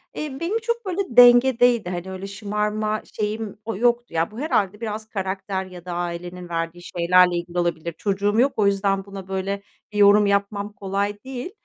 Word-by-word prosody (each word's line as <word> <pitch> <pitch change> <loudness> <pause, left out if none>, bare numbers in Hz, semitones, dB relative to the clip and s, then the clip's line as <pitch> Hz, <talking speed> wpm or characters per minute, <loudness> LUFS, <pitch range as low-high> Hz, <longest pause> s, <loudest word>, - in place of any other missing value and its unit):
Eee, 290 -3 -5
benim 385 +7 -1
çok 470 0 -3
böyle 375 +1 -1 0.2
dengedeydi, 245 -3 +6
hani, 180 +1 -5
öyle 190 +1 -6
şımarma 210 +1 -2
şeyim, 215 0 -3
o 225 - -3
yoktu. 240 0 +1
Ya, 165 +4 0
bu 220 - -9
herhâlde 210 - 0
biraz 220 0 -5
karakter 190 -1 -3
ya 180 -1 -12
da 180 - -5
ailenin 175 +1 -5
verdiği 165 +1 -3
şeylerle 180 +1 +3
ilgili 175 +1 -3
olabilir. 170 -1 -1
Çocuğum 205 +2 0
yok 270 +3 +3
o 210 - +3
yüzden 195 0 +1
buna 195 -1 -9
böyle 195 +1 -3 0.3
bir 210 - -6
yorum 205 +1 +6
yapmam 200 +1 0
kolay 200 +1 -3
değil, 260 +5 -6
200 Hz, 175 wpm, -23 LUFS, 185-225 Hz, 0.3 s, dengedeydi